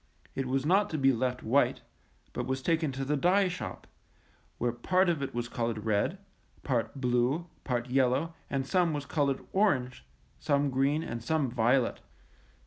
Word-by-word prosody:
It 135 -1 -2
was 135 +2 0
not 200 +5 +3
to 155 - -2
be 135 -1 +4
left 125 +1 -1
white, 135 +6 +2 0.5
but - - -3
was 130 0 -2
taken 160 -2 +1
to 135 +1 -3
the 150 +2 +1
dye 185 +7 +3
shop, 180 0 -6 0.7
where 120 0 0
part 180 +10 +2
of 165 -4 0
it 135 - -4
was 120 0 -2
colored 115 -3 -3
red, 110 - +1 0.5
part 130 +1 -1
blue, 125 +5 +1 0.2
part 120 -2 -2
yellow, 130 +5 +1 0.2
and 135 -1 -1
some 175 +1 +2
was 145 -1 -3
colored 140 -3 0
orange, 130 - +1 0.4
some 145 -2 +1
green, 140 +4 +1
and 115 -7 -5
some 145 -1 0
violet. 120 +1 +2
135 Hz, 165 wpm, -30 LUFS, 125-160 Hz, 0.7 s, be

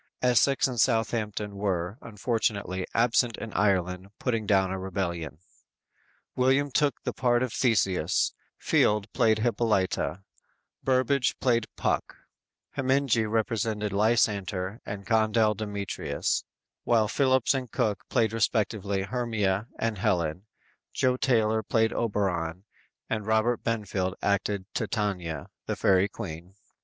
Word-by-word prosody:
Essex 125 +3 +4
and 125 -3 -4
Southampton 110 -3 0
were, 95 +1 -2
unfortunately, 105 -4 -2
absent 115 0 +2
in 110 - -7
Ireland 95 -2 +1
putting 115 -5 -1
down 95 -2 +3
a 95 - -3
rebellion. 85 -5 -3 1.0
William 135 +3 +2
took 145 +1 +1
the - - -2
part 120 -1 +2
of 125 - -3
Theseus, 95 -7 +1 0.2
Field 105 -1 +2
played 115 -3 +3
Hippolyta, 105 - 0 0.6
Burbage 130 0 +2
played 115 -3 +2
Puck, - - -1 0.5
Heminge 135 0 +1
represented 110 -1 -1
Lysander, 100 -2 +1
and 100 -1 -6
Condell 110 -1 +3
Demetrius, 100 -1 -2 0.4
while 115 -3 +3
Phillips 130 +1 +2
and 130 -3 -3
Cooke 110 -6 0
played 115 -4 +1
respectively 105 -3 0
Hermia 110 -3 -1
and 115 -3 -2
Helen, 90 -2 0 0.4
Jo 125 -1 +1
Taylor 110 -5 +2
played 110 +1 +1
Oberon 95 -6 -1 0.4
and 110 -2 -3
Robert 110 +2 +2
Benfield 100 -4 -1
acted 100 -1 0
Titania, 90 -9 -2 0.2
the - - -1
fairy 95 +1 +3
queen. 90 0 -8
110 Hz, 115 wpm, -27 LUFS, 95-120 Hz, 1.0 s, Essex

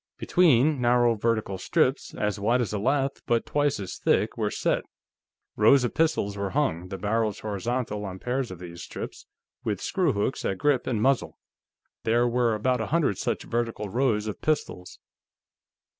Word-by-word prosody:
Between, 150 -5 +3
narrow 120 -1 +4
vertical 110 -3 -1
strips, - - 0
as 105 0 -1
wide 115 +5 +2
as 115 -5 -1
a 105 - -1
lath 135 +4 0
but 115 -1 +1
twice 145 -3 0
as 95 -3 -6
thick, - - +1
were - - -1
set. - - 0 0.7
Rows 125 +5 +5
of 125 - -1
pistols 155 -11 +1
were 100 -1 -2
hung, 95 - -1
the 95 - -6
barrels 105 +1 -1
horizontal, 105 +1 -2
on 95 -1 -6
pairs 125 +4 -2
of 95 - -8
these 85 -1 -9
strips, - - -8 0.4
with 105 -4 -2
screwhooks 135 - 0
at 95 - -1
grip 145 +2 +1
and 110 -4 0
muzzle. 135 -1 +1 0.7
There 120 +2 +3
were 120 -2 +2
about 125 +3 0
a 110 - -2
hundred 155 - +1
such - - -2
vertical 115 -3 -2
rows 115 -2 +1
of 105 - -5
pistols. 120 -12 -2
115 Hz, 165 wpm, -26 LUFS, 105-130 Hz, 0.7 s, Rows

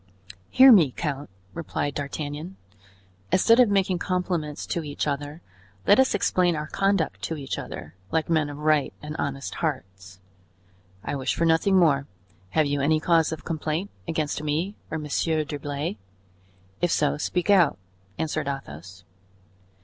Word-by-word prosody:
"Hear 265 +1 +8
me, 175 - +7
count," 145 0 -4 0.2
replied 150 -3 -3
D'Artagnan; 145 +5 -5 0.8
"instead 230 +6 +5
of 245 -4 +6
making 190 -3 +1
compliments 180 -5 -2
to 170 - -2
each 145 -1 -3
other, 145 +2 -4 0.4
let 205 - +6
us 265 -4 +4
explain 180 -3 +2
our 150 0 -3
conduct 195 0 0
to 160 - -3
each 135 -2 -4
other, - - -8 0.2
like 160 -1 0
men 155 -3 +1
of 145 - -7
right 150 -1 +1
and 150 +1 -6
honest 140 -1 -3
hearts." 95 - -4 0.8
"I - - -3
wish 130 -1 -1
for 165 - +1
nothing 165 +4 +3
more; 145 -6 +3 0.4
have 155 +9 +2
you 145 0 -1
any 155 +3 +3
cause 165 0 +2
of 160 - -6
complaint 160 +3 -3 0.2
against 155 -2 -2
me 155 +6 -1 0.2
or 160 - -3
Monsieur 155 +1 0
d'Herblay? 145 -6 -4 0.8
If 175 - +2
so, 145 -3 +1
speak 180 +5 0
out," 170 - +4 0.4
answered 155 -2 -2
Athos. 95 - -7
155 Hz, 150 wpm, -25 LUFS, 145-170 Hz, 0.8 s, Hear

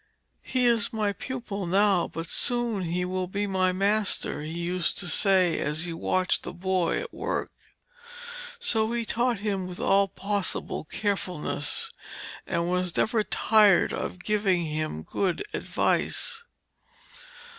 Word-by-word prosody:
'He 255 -1 0
is 235 -3 +2
my 215 -2 0
pupil 210 -5 -5
now, 195 -1 +3
but 165 +1 -6
soon 235 -3 +1
he 180 +2 -1
will 185 0 -2
be 200 +3 -2
my 185 -2 +1
master,' 200 -2 +1
he 155 +1 -6
used 175 +1 0
to 180 - -1
say 185 +1 +3
as 150 +3 -1
he 170 - -3
watched 185 +2 0
the - - -7
boy 185 -1 0
at 485 - -8
work. - - -3 1.1
So 225 - +1
he 235 -1 -1
taught 240 +1 0
him 195 -3 -1
with 180 -1 -8
all 195 0 +3
possible 200 -4 -1
carefulness, 190 - -1 0.6
and 170 -2 -1
was 180 -1 -1
never 220 -1 +2
tired 210 -3 +4
of 180 - -5
giving 195 -5 +1
him 155 - -3
good 185 - -1
advice. 470 -1 0
195 Hz, 135 wpm, -27 LUFS, 180-215 Hz, 1.1 s, tired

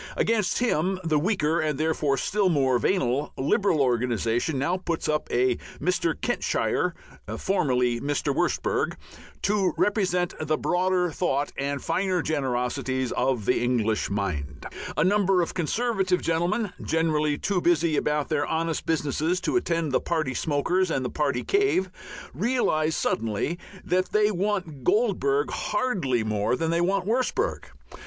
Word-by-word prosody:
Against 210 -5 +1
him 190 -6 +1
the 155 -3 +2
weaker 165 -3 +1
(and 155 -3 0
therefore 155 -3 +1
still 200 +3 +1
more 135 -6 +2
venal) 140 -6 0
Liberal 165 - +2
organization 120 +2 0
now 140 +7 +1
puts 170 -3 -3
up 150 0 0
a 125 0 +2 0.2
Mr. 175 -2 0
Kentshire 245 - 0 0.4
(formerly 125 - +1
Wurstberg) 145 0 0 0.5
to 195 -4 +2
represent 185 -4 +1
the 155 0 0
broader 180 -1 +1
thought 145 -4 -1
and 140 0 -3
finer 185 +1 0
generosities 130 -2 -1
of 125 -5 0
the - - +2
English 115 -3 0
mind. 75 -8 -3 0.3
A 150 - +3
number 195 0 +3
of - - -4
Conservative 190 +1 0
gentlemen, 175 +5 0
generally 155 -2 +1
too 195 +1 -1
busy 170 -2 +2
about 150 0 0
their 150 -2 0
honest 165 0 -2
businesses 160 +2 0
to 185 - -1
attend 165 - 0
the - - +2
party 155 -6 -1
"smokers" 160 +7 0
and 135 -5 -1
the - - -3
party 140 -5 0
cave, 400 - +1 0.4
realize 165 -9 +1
suddenly 115 - -1 0.3
that 185 +1 +1
they 210 0 +3
want 185 -7 -2
Goldbug 150 - +1
hardly 185 - 0
more 105 +2 0
than 165 +3 -1
they 170 +1 +1
want 190 +1 +1
Wurstberg. 255 - 0
160 Hz, 135 wpm, -26 LUFS, 135-185 Hz, 0.5 s, A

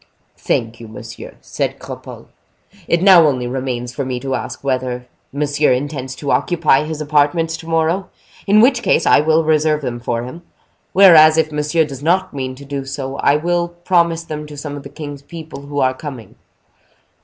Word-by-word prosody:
"Thank 115 0 -2
you, 115 - -10
monsieur," 110 - -10
said - - -3
Cropole. - - -10 0.6
"It 170 +1 +1
now 180 -5 +7
only 130 -4 -1
remains 125 -1 -4
for 140 - -3
me 130 -1 -3
to 135 -1 -3
ask - - -5
whether 130 -2 -2 0.3
monsieur 145 0 +1
intends 130 -1 -4
to 140 +1 -3
occupy 165 -5 +2
his 155 -1 -5
apartments 155 +2 +1
to 165 - -12
morrow, 165 +3 0 0.4
in 210 +2 +5
which 245 0 +4
case - - +2
I - - +5
will 160 +2 +2
reserve 155 -1 +2
them 125 -3 -4
for 120 -1 -2
him; 130 +8 -9 0.5
whereas, 160 -5 +7
if 155 -1 +1
monsieur 150 +2 +1
does 140 -3 -9
not 185 +4 +1
mean 130 -2 -4
to 140 +2 -12
do 140 -1 -4
so, 135 0 -5
I 140 - +3
will 170 +2 0
promise 170 -1 0
them 150 -2 -6
to 150 -1 -11
some 145 0 -6
of 145 - -7
the 140 - -10
king's 145 -1 -8
people 155 -2 -10
who 145 0 -3
are 130 0 +2
coming." 130 -4 -9
150 Hz, 185 wpm, -18 LUFS, 135-165 Hz, 0.6 s, now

